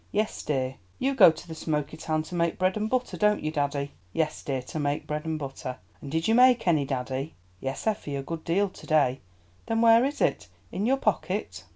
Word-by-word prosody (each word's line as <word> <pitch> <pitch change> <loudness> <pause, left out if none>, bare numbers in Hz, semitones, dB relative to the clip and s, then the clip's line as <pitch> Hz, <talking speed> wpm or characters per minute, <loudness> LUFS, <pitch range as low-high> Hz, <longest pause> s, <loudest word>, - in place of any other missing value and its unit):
"Yes, 215 +1 -1
dear." 130 -2 -2 0.2
"You 275 +1 0
go 225 -10 +9
to 160 - -6
the 165 - -6
Smoky 155 -2 -2
Town 155 0 -1
to 160 - -11
make 170 -1 0
bread 185 0 +1
and 215 0 -1
butter, 255 0 -1
don't 210 0 +2
you, 155 - -1
daddy?" 145 -2 -1 0.2
"Yes, 160 -1 -1
dear, 135 -2 -3
to 155 - -6
make 145 0 -1
bread 150 +1 -3
and 160 -1 -1
butter." 135 -3 -6 0.2
"And 140 - -7
did 160 +1 0
you 225 - +4
make 250 -2 +5
any, 155 -5 +3
daddy?" 130 +2 -3 0.2
"Yes, 135 +4 -4
Effie, 205 -10 -1
a 135 - -3
good 165 +3 -5
deal 195 +5 +2
to - - -14
day." 140 -5 +3 0.5
"Then 225 0 +1
where 230 +1 +7
is 280 +2 -1
it? - - +1 0.2
In 200 +5 -1
your 270 +2 +3
pocket?" 190 - -2
160 Hz, 220 wpm, -27 LUFS, 140-210 Hz, 0.5 s, go